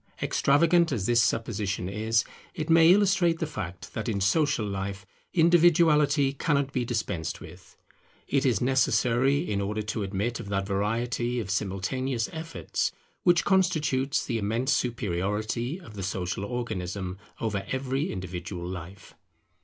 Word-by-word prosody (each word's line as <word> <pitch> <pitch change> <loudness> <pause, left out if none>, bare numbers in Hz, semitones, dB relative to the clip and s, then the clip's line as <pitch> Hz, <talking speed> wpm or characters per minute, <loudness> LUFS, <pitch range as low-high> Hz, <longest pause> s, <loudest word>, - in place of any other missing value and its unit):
Extravagant 170 +4 +3
as 110 -8 -1
this 120 +1 +4
supposition 105 -5 -1
is, 110 +3 +1 0.3
it 155 +1 -2
may 165 +1 +7
illustrate 190 -4 +3
the 165 - -2
fact 95 - -7
that 110 +2 -3
in 100 -3 -1
social 120 +4 +2
life 100 0 -4 0.3
individuality 160 -4 +4
cannot 140 -1 0
be 125 - 0
dispensed 110 -9 -3
with. - - -14 0.5
It 140 0 +1
is 120 -7 +2
necessary 130 +1 +2
in 100 -1 -1
order 105 +2 -2
to 105 +1 -3
admit 100 +4 -2
of 100 - -7
that 100 -1 -1
variety 120 +5 -1
of 100 -5 -4
simultaneous 110 +6 -1
efforts 160 0 -3 0.3
which 175 -1 +3
constitutes 155 -8 +1
the 115 -3 -1
immense 115 +5 0
superiority 110 - -1
of 115 - -13
the 100 - -6
Social 95 +1 -3
Organism 95 -5 -4 0.2
over 105 -3 -2
every 130 +2 -1
individual 90 -1 -5
life. 90 +2 -8
115 Hz, 135 wpm, -27 LUFS, 100-140 Hz, 0.5 s, may